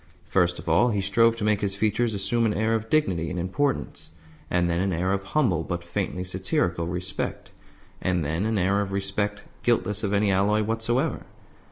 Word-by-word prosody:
First 90 -2 +1
of - - -10
all 95 +10 +4
he 105 -3 0
strove 115 +4 +3
to 115 - -5
make 105 -1 +2
his 100 -1 0
features 110 +2 0
assume 115 +4 +1
an 105 - -1
air 110 +1 +1
of 110 0 -2
dignity 90 - +1
and 90 - -4
importance, 120 +11 -2 0.4
and 90 -1 +2
then 85 0 0
an 95 +1 0
air 90 +3 0
of 100 0 -2
humble, 95 - +2
but 85 +1 -4
faintly 90 +1 -3
satirical, 90 -2 -1
respect, 90 +1 -4 0.5
and 90 -4 0
then 80 +8 -1
an 110 -1 0
air 100 +2 +2
of 100 -1 -3
respect 100 +1 -1 0.2
guiltless 105 -4 +1
of 100 - 0
any 100 0 +2
alloy 105 +3 +2
whatsoever. 115 +7 -1
100 Hz, 190 wpm, -25 LUFS, 90-110 Hz, 0.5 s, all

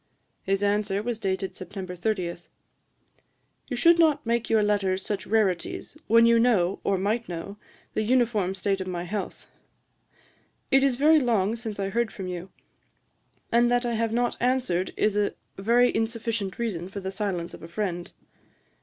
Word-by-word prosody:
His 195 +1 0
answer 205 0 +1
was 235 -1 -3
dated 190 -1 -2
September 185 -1 -7
30: 180 -2 -2 1.3
'You 250 - -3
should 335 +7 +5
not 315 -6 +3
make 235 0 0
your 220 -1 +4
letters 195 -2 0
such 200 -3 -3
rarities, 200 - 0
when 230 +1 +6
you 230 0 +5
know, 200 -6 +2
or 195 - +1
might 215 +4 -1
know, 175 +4 -6 0.4
the - - 0
uniform 220 -5 +1
state 195 0 -1
of 185 - -5
my 175 -1 -3
health. 195 +3 -5 1.3
It 270 0 +5
is 275 -3 +3
very 305 +4 +5
long 225 -5 +1
since 225 -3 -6
I 195 0 -1
heard 235 +2 0
from 190 - -7
you; 180 0 -5 1.0
and 240 +1 +4
that 245 0 +2
I 240 - -1
have 225 0 0
not 240 +1 0
answered 245 -8 0
is 210 -1 +2
a 205 -1 0 0.2
very 240 +5 +3
insufficient 225 -3 -2
reason 190 -7 -3
for 200 - -6
the 190 0 -4
silence 190 -4 -3
of - - -10
a 165 - -8
friend. 175 -1 -3
210 Hz, 165 wpm, -26 LUFS, 190-235 Hz, 1.3 s, when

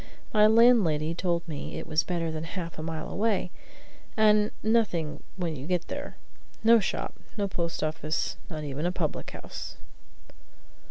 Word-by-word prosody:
My 210 -1 +7
landlady 215 -10 +5
told 170 0 -1
me 150 -4 -5
it - - -5
was 155 0 +2
better 170 -2 -2
than 155 0 -4
half 170 -1 -5
a - - -2
mile 160 0 -4
away, 200 -3 0 0.7
and 210 -1 +5
"nothing 210 -8 +1 0.2
when 170 -4 -2
you 135 +1 -7
get 180 -1 -1
there; - - -5 0.5
no 230 +1 +7
shop; 195 - -2 0.2
no 200 -1 +1
post 170 -3 -2
office; 155 0 -1
not 155 -3 -5
even 145 +3 -2
a - - +1
public 170 -4 -2
house." - - -8
170 Hz, 155 wpm, -28 LUFS, 155-210 Hz, 0.7 s, My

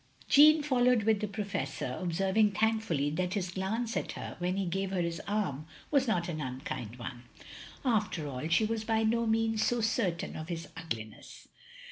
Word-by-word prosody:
Jeanne 305 +1 +7
followed 250 -5 +3
with 220 -1 +3
the 210 - -2
Professor, 195 - -3
observing 190 +4 +2
thankfully 205 -9 +1
that 180 +4 -1
his 185 -3 -2
glance 220 +6 -2
at - - -2
her, - - -6
when 180 +2 -1
he 195 - 0
gave 190 +2 -1
her 190 -1 -1
his 170 -1 -2
arm, 180 -8 -1 0.2
was 275 -3 +3
not 175 -6 +1
an 155 -3 -3
unkind 125 -4 -5
one. 120 0 -8 0.6
After 210 - 0
all, 135 +2 -4
she 165 +7 +4
was 220 0 -2
by 225 0 +1
no 230 +1 +2
means 225 0 +2
so 240 - +1
certain 215 -6 0
of 155 - -6
his 165 -1 -4
ugliness. 110 -10 -7
195 Hz, 175 wpm, -31 LUFS, 165-225 Hz, 0.6 s, Jeanne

